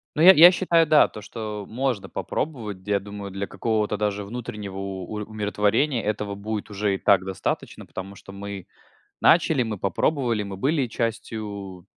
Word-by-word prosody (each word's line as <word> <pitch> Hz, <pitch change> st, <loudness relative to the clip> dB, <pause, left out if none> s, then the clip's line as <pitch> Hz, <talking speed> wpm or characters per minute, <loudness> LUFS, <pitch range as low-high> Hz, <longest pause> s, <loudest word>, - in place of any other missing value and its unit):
Ну, 155 Hz, -, 0 dB
я 180 Hz, +3 st, +11 dB
я 175 Hz, +1 st, +10 dB
считаю, 175 Hz, -2 st, +3 dB
да, 155 Hz, -1 st, +6 dB
то, 105 Hz, -, -10 dB
что 105 Hz, -2 st, -6 dB
можно 125 Hz, -3 st, -2 dB
попробовать, 115 Hz, -10 st, -4 dB
я 100 Hz, -1 st, +2 dB
думаю, 100 Hz, 0 st, -8 dB
для 100 Hz, +1 st, -4 dB
какого-то 105 Hz, -2 st, -1 dB
даже 105 Hz, 0 st, -1 dB
внутреннего 105 Hz, -3 st, -6 dB
у 95 Hz, -1 st, -5 dB, 0.2 s
умиротворения 110 Hz, +5 st, 0 dB
этого 105 Hz, -1 st, -2 dB
будет 105 Hz, +1 st, -4 dB
уже 105 Hz, 0 st, 0 dB
и -, -, -1 dB
так 95 Hz, -3 st, +4 dB
достаточно, 95 Hz, -2 st, -4 dB
потому 95 Hz, +1 st, -7 dB
что 100 Hz, -, -12 dB
мы 100 Hz, -1 st, -7 dB, 0.5 s
начали, 160 Hz, -5 st, +4 dB
мы 110 Hz, -3 st, -2 dB
попробовали, 115 Hz, -, 0 dB
мы 100 Hz, -1 st, -6 dB
были 135 Hz, -, +1 dB
частью 105 Hz, -5 st, -4 dB
105 Hz, 160 wpm, -24 LUFS, 100-120 Hz, 0.5 s, я